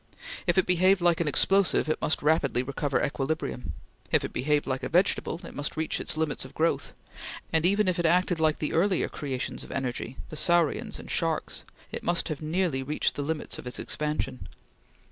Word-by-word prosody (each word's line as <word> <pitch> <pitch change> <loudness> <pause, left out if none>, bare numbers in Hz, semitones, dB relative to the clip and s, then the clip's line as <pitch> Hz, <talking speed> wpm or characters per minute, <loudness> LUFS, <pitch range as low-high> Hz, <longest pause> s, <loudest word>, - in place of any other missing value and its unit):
If 175 - +2
it 190 - +5
behaved 185 +2 +4
like 175 -1 +3
an 165 - 0
explosive, 195 +6 +3
it 155 - -1
must 155 - +1
rapidly 145 -5 +2
recover 140 +1 -1
equilibrium; 135 - -3 0.4
if - - +3
it - - -6
behaved 150 +2 +1
like 130 -1 -2
a - - -3
vegetable, 175 -1 +2
it - - -9
must 145 +1 -3
reach 160 0 -1
its - - -4
limits 155 -2 -1
of 130 - -12
growth; 165 +1 0 0.6
and 160 +1 +4
even 200 +1 +3
if 180 -1 +1
it 170 - +3
acted 175 0 +2
like 155 -1 +3
the 150 - -2
earlier 185 +2 +2
creations 135 -3 -4
of - - -10
energy 125 -1 -3
the - - -7
saurians 175 +7 +2
and - - -8
sharks 165 -2 -1 0.3
it - - -4
must 175 0 +1
have 155 -2 -4
nearly 155 -3 0
reached 145 +3 0
the - - -4
limits 150 +2 -3
of - - -8
its 125 - -3
expansion. 150 -4 -3
160 Hz, 195 wpm, -28 LUFS, 145-175 Hz, 0.6 s, it